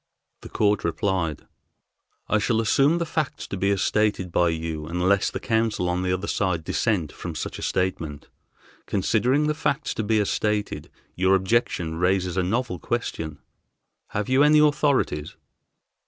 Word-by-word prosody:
The - - -10
court 105 -1 +1
replied: 85 -2 -1 0.8
"I 110 - +2
shall 110 +1 +1
assume 140 +8 +3
the 170 - -1
facts 155 -3 -3
to - - -5
be 100 +1 0
as 100 -2 +1
stated 105 -4 +1
by 85 0 +3
you 80 -1 -4
unless 90 +3 +2
the - - -5
counsel 110 -5 0
on 90 +1 0
the 90 0 0
other 95 +2 -1
side 90 -6 -1
dissent 90 -5 0
from 85 -3 -7
such - - -5
a - - -8
statement. 80 -6 -2 0.6
Considering 120 +9 +1
the 150 - +1
facts 150 -1 -1
to 110 - -2
be 110 +1 +2
as 105 - 0
stated, 105 -1 -1 0.2
your 95 +1 +3
objection 95 -5 0
raises 90 0 +1
a 95 - +2
novel 110 +1 -1
question. 80 0 -3 0.7
Have 105 0 -3
you 130 +2 +3
any 150 +1 +6
authorities?" 145 - +2
100 Hz, 160 wpm, -24 LUFS, 90-115 Hz, 0.8 s, any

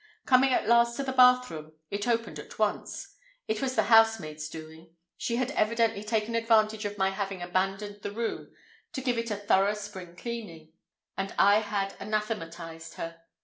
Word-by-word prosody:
Coming 260 0 +5
at - - +2
last 235 0 +4
to 275 - -2
the 265 - -2
bathroom, 250 -12 +4 0.2
it 205 +3 -2
opened 230 -1 -1
at - - -11
once. - - -2 0.3
It 220 0 -1
was 260 -1 -1
the 220 - +3
housemaid's 200 -9 +3
doing. 160 +1 -11 0.2
She 235 - -2
had 255 +2 0
evidently 225 -4 +1
taken 220 +1 -1
advantage 220 -2 +2
of 205 0 -4
my 190 -1 +2
having 195 -2 -4
abandoned 195 +3 -2
the - - -4
room 230 +2 -4 0.4
to 265 - -3
give 250 -3 0
it 230 0 -3
"a 210 - -1
thorough 205 0 +2
spring 190 -4 -8
cleaning," 170 -8 -7 0.4
and 195 0 -3
I 200 +1 +6 0.4
anathematized 165 -7 -4
her. 165 0 -7
210 Hz, 165 wpm, -28 LUFS, 185-230 Hz, 0.4 s, I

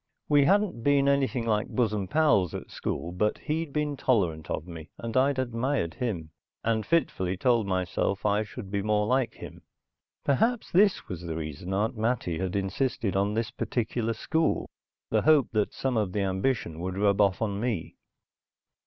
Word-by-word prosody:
We 145 -2 +5
hadn't 200 - +2
been 140 -1 +3
anything 135 -4 +1
like 110 0 +1
bosom 105 -6 0
pals 145 - +3
at - - -7
school; 85 - -3
but 105 +4 0
he'd 160 0 -3
been 150 0 -1
tolerant 90 - 0
of - - -3
me, 80 -3 -9
and 115 -1 -6
I'd 135 +1 +3
admired 120 - -1
him, 85 -8 -3 0.3
and 110 -1 +1
fitfully 95 - 0
told 115 -1 +2
myself 95 +1 -1
I 105 0 +3
should 110 -1 -8
be 100 0 0
more 105 0 +1
like 125 0 +1
him. - - -10 0.6
Perhaps 225 - +1
this 195 +2 +3
was 90 -2 -6
the 85 -2 -4
reason 80 +3 -5
Aunt 105 +6 0
Mattie 110 -7 -1
had 95 -1 -2
insisted 100 +1 -1
on 100 +2 +1
this 115 0 -1
particular 115 -1 -2
school, 160 +8 0 0.4
the - - +3
hope 155 -4 +4
that 105 -2 +1
some 130 -3 -1
of 100 -4 0
the 105 - 0
ambition 95 -3 -1
would 90 +2 -4
rub 100 0 +3
off 100 -2 +3
on 100 -3 -1
me. 110 -7 -2
110 Hz, 170 wpm, -28 LUFS, 95-130 Hz, 0.6 s, We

